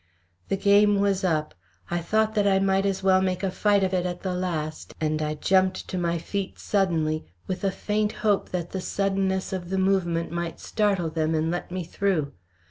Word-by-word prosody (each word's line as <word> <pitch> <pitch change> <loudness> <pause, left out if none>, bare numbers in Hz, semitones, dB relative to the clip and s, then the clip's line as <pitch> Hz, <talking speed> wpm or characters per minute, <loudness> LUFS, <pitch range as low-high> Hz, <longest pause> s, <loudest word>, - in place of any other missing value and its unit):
The 195 - 0
game 205 +1 +4
was 200 -1 +1
up. 155 -4 0 0.4
I 175 - +1
thought 215 +6 +1
that 205 -2 +2
I 195 -1 +4
might 195 0 +2
as 195 -1 -2
well 190 -1 +5
make 185 0 -1
a 190 - 0
fight 205 +1 +2
of 190 0 0
it 180 -1 +1
at 180 -1 -4
the 185 -2 -1
last, 165 -4 -3
and 155 0 0
I 150 0 -1
jumped 185 +4 +1
to - - -4
my 170 -1 0
feet 195 +3 -4
suddenly, 165 -6 0 0.2
with 185 +1 -4
a 195 - +3
faint 210 +2 -1
hope 205 -2 +2
that 175 -2 -3
the 190 - -3
suddenness 195 -1 -1
of 180 -2 -4
the 190 - -1
movement 180 -4 +1
might 170 -1 -4
startle 195 -6 0
them 160 0 0
and 160 +1 0
let 175 - -3
me 180 0 -3
through. 165 -5 -1
185 Hz, 205 wpm, -25 LUFS, 170-195 Hz, 0.4 s, well